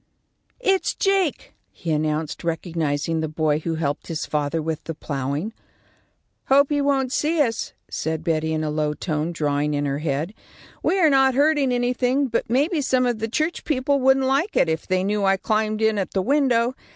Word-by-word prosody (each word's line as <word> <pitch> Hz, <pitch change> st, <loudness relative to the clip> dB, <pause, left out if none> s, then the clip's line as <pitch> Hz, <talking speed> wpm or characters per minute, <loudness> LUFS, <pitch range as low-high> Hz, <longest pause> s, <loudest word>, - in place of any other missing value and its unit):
"It's 390 Hz, -6 st, +1 dB
Jake," 390 Hz, -6 st, 0 dB, 0.2 s
he 165 Hz, -, -5 dB
announced, 155 Hz, 0 st, -1 dB
recognising 165 Hz, -2 st, -1 dB
the 160 Hz, -, -1 dB
boy 155 Hz, -1 st, 0 dB
who 165 Hz, +1 st, -3 dB
had -, -, -5 dB
helped 145 Hz, -2 st, -2 dB
his 165 Hz, -2 st, -3 dB
father 150 Hz, +1 st, -1 dB
with 160 Hz, 0 st, -3 dB
the 165 Hz, -, -5 dB
ploughing. 145 Hz, +9 st, -3 dB, 0.9 s
"Hope 275 Hz, +1 st, +4 dB
he 290 Hz, -1 st, +2 dB
won't 270 Hz, -2 st, +1 dB
see 310 Hz, +3 st, +1 dB
us," 230 Hz, -7 st, 0 dB
said 160 Hz, 0 st, -3 dB
Betty, 160 Hz, -2 st, 0 dB
in 155 Hz, 0 st, -1 dB
a 155 Hz, -, -1 dB
low 150 Hz, 0 st, -1 dB
tone, 155 Hz, 0 st, -2 dB
drawing 150 Hz, -2 st, 0 dB
in 145 Hz, 0 st, -1 dB
her 140 Hz, 0 st, -1 dB
head. 155 Hz, +4 st, -2 dB, 0.5 s
"We 385 Hz, -, +1 dB
are 320 Hz, -4 st, +5 dB
not 265 Hz, -1 st, +4 dB
hurting 290 Hz, -2 st, +3 dB
anything, 250 Hz, +2 st, +1 dB
but 230 Hz, -, -1 dB
maybe 290 Hz, +7 st, +1 dB
some 255 Hz, -2 st, +2 dB
of 240 Hz, -3 st, 0 dB
the 225 Hz, -, -1 dB
church 310 Hz, +8 st, -1 dB
people 280 Hz, -1 st, +1 dB
wouldn't 265 Hz, 0 st, +3 dB
like 275 Hz, +10 st, +1 dB
it, -, -, +4 dB
if 160 Hz, 0 st, -2 dB
they 185 Hz, 0 st, +1 dB
knew 205 Hz, +1 st, 0 dB
I 195 Hz, 0 st, +3 dB
climbed 215 Hz, +1 st, 0 dB
in 220 Hz, -1 st, +2 dB
at 190 Hz, -, -3 dB
the 190 Hz, -, +1 dB
window. 255 Hz, -2 st, +2 dB
205 Hz, 190 wpm, -23 LUFS, -, 0.9 s, are